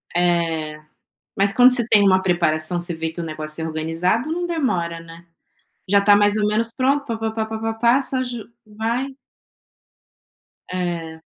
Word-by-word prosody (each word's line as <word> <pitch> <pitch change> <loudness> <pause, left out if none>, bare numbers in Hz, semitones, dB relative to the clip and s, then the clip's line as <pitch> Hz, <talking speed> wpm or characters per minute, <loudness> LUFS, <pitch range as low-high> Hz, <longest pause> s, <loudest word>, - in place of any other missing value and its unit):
É. 165 -3 0 0.6
Mas, 200 0 +3
quando 250 +3 +7
você 245 -3 0
tem 210 -3 +5
uma 190 -1 +4
preparação, 175 -2 0
você 175 0 -1
vê 160 0 -3
que 165 +2 -7
o - - -4
negócio 155 0 -4
é - - -2
organizado, 165 - -1
não 350 +2 -2
demora, 185 - -1
né. 165 +1 -13 0.6
Já 200 +1 +5
tá 205 0 +6
mais 205 +1 +3
ou 210 -1 +1
menos 225 +2 0
pronto, 275 +2 +1
pá 230 -4 -3
pá 225 0 -2
pá 220 0 -2
pá 220 0 -5
pá 225 0 -2
pá, 235 +4 +3
só 260 -1 -1
ju 240 -3 -7 0.2
vai 225 +5 -2 1.6
É. 170 -3 -4
200 Hz, 175 wpm, -21 LUFS, 165-230 Hz, 1.6 s, quando